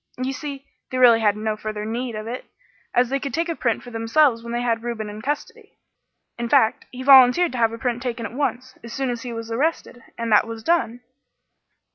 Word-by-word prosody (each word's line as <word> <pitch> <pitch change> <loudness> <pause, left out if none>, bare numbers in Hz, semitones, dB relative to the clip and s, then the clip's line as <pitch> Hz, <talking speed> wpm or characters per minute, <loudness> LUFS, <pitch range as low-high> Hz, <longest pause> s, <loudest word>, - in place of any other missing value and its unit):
You 260 +1 -2
see, 280 0 -7 0.2
they 255 - -3
really 240 -3 +6
had 210 -2 +2
no 215 0 -2
further 215 0 -5
need 235 +1 -3
of 215 0 -5
it, 245 +3 -6 0.5
as 245 0 +2
they 275 +1 0
could 275 -1 -4
take 335 +1 -1
a 335 - -1
print 235 -6 -1
for 245 - -11
themselves 230 +2 +2
when 235 0 -8
they 240 +1 -2
had 230 -2 0
Reuben 225 -3 -4
in 210 +1 -9
custody; 400 - -5 0.6
in 235 0 -3
fact, 220 - +3
he 255 +1 -8
volunteered 270 +5 +7
to 250 - -4
have 225 -1 +3
a 230 - -6
print 240 0 -2
taken 240 -2 -4
at 225 - -7
once, 255 -1 -3
as 235 -1 -9
soon 265 -2 -1
as 240 -1 -5
he 245 - -6
was 230 0 -6
arrested, 265 -1 -2 0.2
and 230 -1 -3
that 215 - +5
was 225 -1 -7
done." 250 -8 0
240 Hz, 225 wpm, -22 LUFS, 225-265 Hz, 0.6 s, volunteered